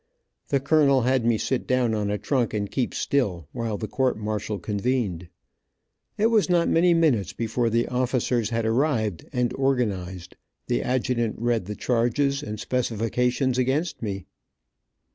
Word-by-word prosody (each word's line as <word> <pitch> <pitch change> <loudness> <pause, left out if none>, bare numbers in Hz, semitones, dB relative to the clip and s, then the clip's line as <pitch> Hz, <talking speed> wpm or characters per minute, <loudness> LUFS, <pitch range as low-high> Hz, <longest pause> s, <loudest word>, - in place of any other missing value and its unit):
The 140 - +1
colonel 140 -1 +4
had 125 -1 +1
me 115 -2 +3
sit 130 +3 -2
down 125 -3 +2
on 105 -2 -1
a 105 - 0
trunk 120 +1 0
and 100 -1 -2
keep 130 -3 -1
still, 95 - 0
while 115 -3 -3
the 110 - -4
court 130 -1 0
martial 105 -1 -3
convened. 100 -3 -2 0.9
It 220 +2 +3
was 215 -4 +3
not 175 -1 +3
many 170 +1 +4
minutes 145 -12 +2
before 115 +1 -1
the 115 +1 +1
officers 125 -3 0
had 115 -1 -1
arrived, 110 - 0
and 125 -1 0
organized, 95 -10 -2 0.3
the - - 0
adjutant 120 -3 0
read 115 -3 0
the 105 +2 -5
charges 130 +5 +1
and 105 -5 -6
specifications 125 +2 0
against 140 +7 0
me. 100 -5 -4
120 Hz, 150 wpm, -25 LUFS, 105-130 Hz, 0.9 s, colonel